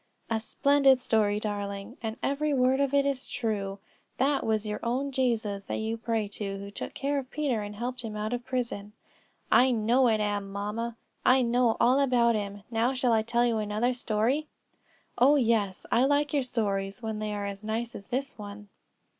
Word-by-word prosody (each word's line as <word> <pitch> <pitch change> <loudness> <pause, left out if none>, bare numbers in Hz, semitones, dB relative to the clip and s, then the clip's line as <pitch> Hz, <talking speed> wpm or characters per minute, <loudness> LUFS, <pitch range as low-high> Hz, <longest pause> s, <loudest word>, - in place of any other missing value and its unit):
"A 225 - +2
splendid 275 +3 +4
story, 210 -4 +1
darling; 205 +1 -4
and 225 -1 -4
every 290 +1 +1
word 260 +1 +3
of 280 -1 +2
it 280 0 +3
is 275 -2 -2
true. 200 -4 -2 0.4
That 275 +2 +2
was 220 -1 0
your 210 0 -3
own 260 +4 -1
Jesus 225 -6 0
that - - -3
you 220 +1 -2
pray 225 -2 -1
to, 200 -1 -4
who 200 +1 -8
took - - -6
care 280 +1 0
of 260 -2 -8
Peter 275 -7 -1
and 205 0 -6
helped 245 +3 -4
him 220 -2 -6
out 215 +2 -2
of 245 0 -3
prison." 235 -5 -3 0.6
"I 260 - +6
know 240 +2 +3
it 220 -2 +2
am, 205 -1 -1
mamma; 215 +4 -3 0.3
I 255 0 +5
know 240 -1 +2
all 255 +3 +4
about 245 -4 +3
him. 205 -2 -4
Now, 235 +3 +1
shall 250 -2 +2
I 220 - +4
tell 235 +2 +1
you 230 -2 +1
another 215 +4 0
story?" 245 +5 0 0.7
"Oh, 275 +4 +6
yes; 225 -7 +1
I 245 +3 +4
like 290 +2 +2
your 285 - +3
stories 205 -3 -2
when 220 -1 -3
they 215 0 -3
are 205 -1 -3
as 200 0 -6
nice 225 +2 -3
as 200 - -9
this 270 +2 -3
one." 205 0 -9
230 Hz, 195 wpm, -28 LUFS, 210-255 Hz, 0.7 s, I